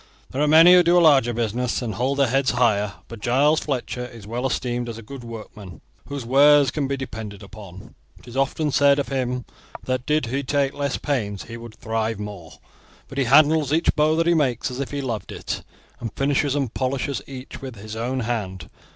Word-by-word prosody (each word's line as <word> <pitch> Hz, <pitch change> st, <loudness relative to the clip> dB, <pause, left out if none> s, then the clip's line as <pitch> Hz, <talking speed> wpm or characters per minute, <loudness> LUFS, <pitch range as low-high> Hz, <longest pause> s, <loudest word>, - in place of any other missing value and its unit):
"There 135 Hz, -, -2 dB
are 150 Hz, -, +3 dB
many 165 Hz, +4 st, +8 dB
who 180 Hz, -, +8 dB
do 175 Hz, +1 st, +4 dB
a -, -, +7 dB
larger 140 Hz, -8 st, +5 dB
business, 120 Hz, +1 st, -1 dB
and 115 Hz, -4 st, -3 dB
hold 130 Hz, +3 st, -1 dB
their 140 Hz, -, +4 dB
heads 135 Hz, +1 st, +1 dB
higher; 105 Hz, -4 st, +2 dB
but 115 Hz, -, -9 dB
Giles 140 Hz, +8 st, +3 dB
Fletcher 125 Hz, -3 st, -3 dB
is 120 Hz, -4 st, -10 dB
well 120 Hz, +5 st, -2 dB
esteemed 120 Hz, -2 st, -2 dB
as 115 Hz, -, -6 dB
a 115 Hz, -, -9 dB
good 135 Hz, +3 st, -9 dB
workman, 105 Hz, -5 st, -10 dB, 0.3 s
whose 140 Hz, -3 st, -5 dB
wares 140 Hz, +2 st, +5 dB
can 145 Hz, -2 st, -2 dB
be 140 Hz, 0 st, -2 dB
depended 110 Hz, -6 st, -7 dB
upon. 100 Hz, 0 st, -12 dB, 0.2 s
It -, -, -19 dB
is 120 Hz, -, -10 dB
often 140 Hz, +3 st, 0 dB
said 140 Hz, 0 st, +4 dB
of 140 Hz, -, -2 dB
him 125 Hz, -2 st, -2 dB, 0.4 s
that 130 Hz, -1 st, -2 dB
did 150 Hz, -2 st, +2 dB
he 130 Hz, +4 st, -2 dB
take 140 Hz, 0 st, 0 dB
less 140 Hz, -1 st, -2 dB
pains 105 Hz, -9 st, -2 dB
he 115 Hz, -, -9 dB
would 115 Hz, -1 st, -10 dB
thrive 110 Hz, -1 st, -2 dB
more; 100 Hz, -6 st, -8 dB, 0.6 s
but 135 Hz, -, -5 dB
he 135 Hz, -, +2 dB
handles 150 Hz, +2 st, +4 dB
each 160 Hz, +2 st, +2 dB
bow 155 Hz, +1 st, +3 dB
that 165 Hz, +1 st, +1 dB
he 170 Hz, -, +4 dB
makes 135 Hz, -5 st, 0 dB
as 125 Hz, -, -6 dB
if 140 Hz, -, -3 dB
he 145 Hz, -1 st, -3 dB
loved 115 Hz, -8 st, -4 dB
it, -, -, -5 dB, 0.4 s
and 115 Hz, -3 st, -5 dB
finishes 140 Hz, 0 st, +1 dB
and 135 Hz, -6 st, -1 dB
polishes 135 Hz, +1 st, -2 dB
each 130 Hz, -1 st, -9 dB
with 130 Hz, -3 st, -7 dB
his 110 Hz, +1 st, -8 dB
own 125 Hz, +3 st, -2 dB
hand. 100 Hz, -8 st, -4 dB
130 Hz, 210 wpm, -23 LUFS, 115-140 Hz, 0.6 s, many